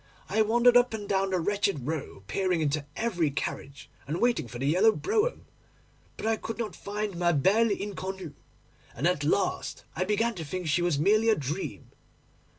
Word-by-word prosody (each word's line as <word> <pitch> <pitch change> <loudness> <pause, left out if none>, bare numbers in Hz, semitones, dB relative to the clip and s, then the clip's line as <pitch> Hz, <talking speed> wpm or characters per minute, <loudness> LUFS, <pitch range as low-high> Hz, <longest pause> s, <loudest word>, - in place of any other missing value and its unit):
I 220 - +2
wandered 240 +3 +4
up 245 -2 +5
and 205 -2 -6
down 195 -1 +1
that 185 -2 0
wretched 200 -7 0
Row, 150 -10 -4
peering 185 - 0
into 150 -1 -1
every 180 -9 0
carriage, 140 0 -5 0.2
and 155 +4 -2
waiting 240 - +1
for 120 - -8
the 130 - -3
yellow 185 +10 +5
brougham; 425 - -1 0.7
but - - -6
I 225 0 +2
could 225 - -6
not 215 -6 -4
find 205 0 -4
ma 175 0 +2
belle 205 +11 +3
inconnue, 190 -4 -4 0.6
and 135 - -2
at 175 -4 +2
last 165 +7 -1
I 180 - 0
began 215 +4 +1
to 170 - -6
think 180 +4 -5
she 160 +3 +1
was 175 -4 +1
merely 215 +8 +3
a 220 - +5
dream. 150 +3 -5
190 Hz, 180 wpm, -28 LUFS, 160-220 Hz, 0.7 s, up